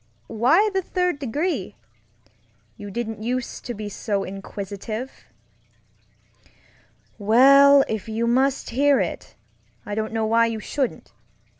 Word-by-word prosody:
Why 255 - +3
the 385 - +1
third 360 -3 -1
degree? 295 +7 -3 1.0
You 205 -2 -9
didn't 225 0 -5
use 245 +2 -3
to 240 - -6
be 210 0 -6
so 205 -1 -3
inquisitive. 200 +5 -7 1.9
Well, 275 +6 +6
if 220 0 -4
you 225 +1 -1
must 260 +3 +1
hear 280 +3 +3
it, - - -4 0.5
I 205 - -5
don't 220 +1 -2
know 225 -1 -1
why 230 +1 +3
you 225 -1 -4
shouldn't. 260 +4 -4
230 Hz, 120 wpm, -23 LUFS, 215-275 Hz, 1.9 s, Well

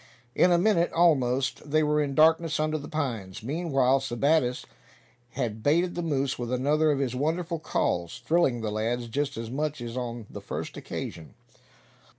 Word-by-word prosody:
In 180 - +4
a 175 - +5
minute, 175 -2 +2
almost, 135 -5 +2
they 155 +1 +3
were 150 0 +2
in 140 -2 -2
darkness 160 +1 +4
under 155 0 0
the 145 - -8
pines. 115 - -4
Meanwhile 135 -2 +1
Sebattis 135 +1 +1 0.7
had 115 -4 -3
baited 170 +7 +2
the 175 - -3
moose 140 -6 -1
with 120 0 -3
another 145 +5 +2
of 145 - 0
his 135 -3 -1
wonderful 165 +4 -1
calls, 120 - -2
thrilling 155 -8 +2
the 110 -1 -2
lads 115 +3 -2
just 140 +3 -2
as 115 0 -5
much 150 +1 -2
as 120 0 -6
on 120 -3 -4
the - - -9
first - - -5
occasion. 80 - -7
140 Hz, 165 wpm, -27 LUFS, 120-155 Hz, 0.7 s, a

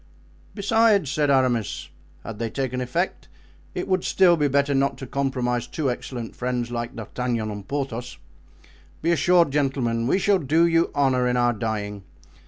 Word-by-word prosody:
"Besides," 205 - +3
said 145 -1 +1
Aramis, 130 -5 +1 0.3
"had 110 -2 -7
they 115 -1 -2
taken 130 0 -3
effect 125 0 -2 0.5
it - - -3
would 185 -1 +2
be - - -9
still 180 -2 +5
better 140 -2 +1
not 135 0 +1
to 135 - -7
compromise 125 -2 -1
two 145 -5 -1
excellent 120 -1 -6
friends 125 -1 -2
like 120 +1 -4
D'Artagnan 115 0 -3
and 100 -1 -8
Porthos. 125 -4 -4 0.9
Be 170 - +2
assured, 170 0 +4
gentlemen, 130 -5 0
we 160 - +3
shall 200 0 +3
do 160 +3 +3
you 165 0 +2
honor 130 -3 +2
in 125 0 +1
our 120 0 +3
dying. 105 -2 -3
130 Hz, 160 wpm, -24 LUFS, 120-150 Hz, 0.9 s, still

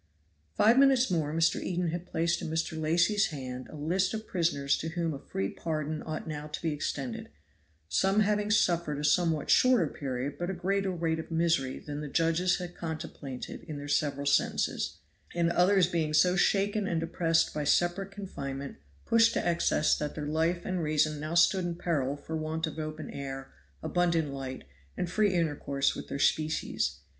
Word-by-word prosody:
Five 230 +4 +5
minutes 265 -3 +5
more 155 -4 0
Mr. 165 +1 +2
Eden 175 -1 -1
had 175 +2 -4
placed 170 +1 0
in - - -4
Mr. 160 +1 -1
Lacy's 175 +7 +3
hands 130 -4 -6
a - - -10
list 185 +7 0
of 220 0 -5
prisoners 160 -7 +1
to 160 - -4
whom 165 -1 -2
a 140 - -6
free 95 -6 -3
pardon 155 -1 -3
ought 155 0 -5
now 150 -1 -5
to 150 - -5
be 160 -2 0
extended, 135 - -4 0.6
some 195 - +2
having 210 0 +1
suffered 170 -7 +2
a 145 - -4
somewhat 160 0 +2
shorter 255 -8 +5
period 140 -1 -4
but 175 +1 -2
a 190 - -2
greater 195 +2 0
weight 165 -2 -1
of 160 - -7
misery 165 -5 +1
than 145 0 -6
the 150 - -5
judges 165 +4 +2
had 180 -2 -6
contemplated 155 -5 -6
in 155 -3 -6
their 145 0 -7
several 145 -1 0
sentences; 80 - +1 0.4
and 170 -1 +2
others 185 +1 +4
being 160 -3 -1
so 180 +3 +5
shaken 200 +2 +2
and 165 - 0
depressed 165 0 +1
by 150 - -2
separate 175 +6 +1
confinement 140 -9 -6 0.3
pushed 230 0 +4
to - - -1
excess 170 -2 +2
that 150 -1 -4
their 150 - -4
life 165 +3 0
and 185 -2 -1
reason 155 -1 +1
now 155 +3 -4
stood 180 +2 +4
in 175 -1 -2
peril 145 -5 -1
for 160 +2 -6
want 160 +1 -2
of 160 0 -6
open 155 0 -5
air, 135 -1 -6 0.3
abundant 170 -5 +1
light, 130 -1 -6 0.3
and 180 - -2
free 210 0 +3
intercourse 145 -5 0
with - - -7
their - - -4
species. 145 - 0
160 Hz, 180 wpm, -29 LUFS, 150-180 Hz, 0.6 s, Five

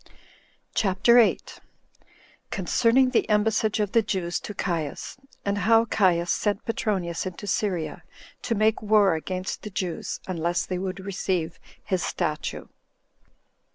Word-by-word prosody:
CHAPTER 220 +4 +4
8. 230 - +1 0.9
Concerning 235 +7 +3
The 235 - +1
Embassage 215 0 +2
Of 205 -2 0
The 230 - +4
Jews 185 -5 -2
To 210 - -8
Caius; 165 -7 -3
28 270 0 -26
And 200 0 0
How 225 +4 +4
Caius 180 -6 +2
Sent 205 0 -1
Petronius 190 -6 -1
Into 185 +3 -7
Syria 185 -4 -1 0.4
To 230 - -1
Make 215 +1 +2
War 210 -3 +4
Against 185 +3 -4
The 210 - -7
Jews, 185 -3 -3
Unless 175 -1 -1
They 180 -1 -3
Would 190 +1 -4
Receive 185 -4 -2 0.2
His 185 -2 -1
Statue. 155 -4 -2
195 Hz, 130 wpm, -25 LUFS, 175-215 Hz, 0.9 s, CHAPTER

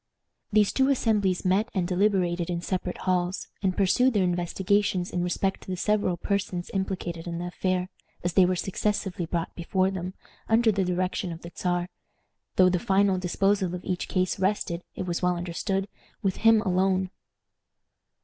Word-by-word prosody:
These 210 -1 +4
two 265 0 +3
assemblies 210 -9 +1
met 195 +5 +2
and 180 -2 +1
deliberated 180 -2 +1
in 170 -1 -2
separate 180 -1 -2
halls, 180 0 0
and 190 -2 0
pursued 230 +6 +3
their 200 - +4
investigations 180 +2 0
in 180 - -1
respect 190 +2 -1
to - - -15
the 185 - -2
several 205 -2 +1
persons 185 -2 -2
implicated 180 -3 -3
in 170 -1 -3
the 175 - -4
affair, 180 +1 -1 0.4
as 175 -1 -1
they 190 - +6
were 185 - +1
successively 190 -1 -2
brought 170 0 -2
before 185 +2 0
them, 185 0 -5 0.3
under 225 0 +4
the 195 -2 0
direction 180 0 -1
of 165 +1 -8
the 170 - -8
Czar, 175 -1 -1 0.7
though 185 - +6
the 180 -1 +2
final 195 0 +2
disposal 190 0 +1
of 180 - -8
each 180 -2 -2
case 185 0 0
rested, 185 -3 0
it 185 - -3
was 175 -1 -2
well 180 -1 +2
understood, 190 +3 -2 0.4
with 195 -2 0
him 225 -1 +5
alone. 185 0 +1
185 Hz, 170 wpm, -27 LUFS, 175-195 Hz, 0.7 s, they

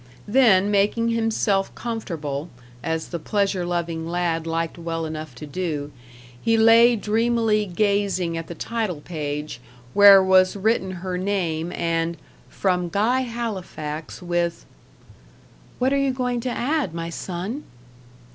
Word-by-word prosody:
Then 205 -4 +4
making 210 +3 +2
himself 225 -4 0
comfortable, 165 -10 -4 0.3
as 160 0 -3
the 170 - -4
pleasure 200 +1 0
loving 170 -2 -2
lad 170 -1 -1
liked 165 +1 -2
well 165 -1 -3
enough 155 -4 -6
to 135 - -8
do, 150 -2 -3 0.5
he 225 0 +2
lay 230 +2 +6
dreamily 220 0 +1
gazing 195 -2 0
at 165 -1 -5
the 170 - -7
title 215 -9 -3
page, 150 -5 -5 0.3
where 200 -1 +9
was 185 0 +4
written 200 -1 +1 0.2
her 180 -1 -2
name, 175 -4 -1
and 165 0 -1 0.3
"From 180 -2 0
Guy 220 +8 +2
Halifax, 190 -11 -5
with 175 -1 -1 0.6
" - - -27
"What 260 +2 +1
are 280 - +2
you 275 -1 +1
going 250 -1 -1
to 250 - -3
add, 255 - -1
my 165 0 -4
son?" 190 - -5
185 Hz, 135 wpm, -23 LUFS, 165-225 Hz, 0.6 s, where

